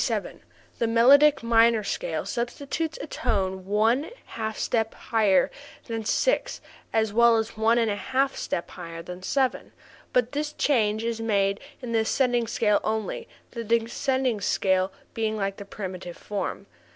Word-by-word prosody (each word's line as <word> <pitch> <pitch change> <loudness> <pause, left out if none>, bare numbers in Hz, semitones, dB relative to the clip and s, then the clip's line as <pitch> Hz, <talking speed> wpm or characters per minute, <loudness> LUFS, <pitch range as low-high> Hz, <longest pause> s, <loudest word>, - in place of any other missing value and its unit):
The 230 - +2
melodic 275 +5 +6
minor 230 -1 +4
scale - - -3
substitutes 285 +6 -3
a - - -5
tone 190 -9 -2
one 225 +8 +2 0.2
half 220 -1 -5
step 225 -2 0
higher 210 -5 +2 0.3
than 225 -2 -4
six - - +1 0.3
as 220 -2 +1
well 235 0 +5
as 220 0 -2
one 225 +2 +3
a 225 -3 +1
half 265 +6 0
step 170 - -3
higher 165 -1 -8
than 180 +1 -8
seven, 260 +6 -1 0.4
but 250 -1 +2
this 295 +1 -3
change 220 -6 +1
is 230 -1 -2
made 200 -3 +1 0.2
in 240 - -4
the 225 - +2
ascending 240 +1 +1
scale 220 -3 +2
only, 215 -2 -2 0.2
the 235 -1 -5
descending 235 +1 0
scale 190 -1 +1 0.2
being 220 -1 -1
like 195 -1 -2
the 200 - -8
primitive 185 -3 -7
form. 205 -1 -4
225 Hz, 145 wpm, -26 LUFS, 205-245 Hz, 0.4 s, melodic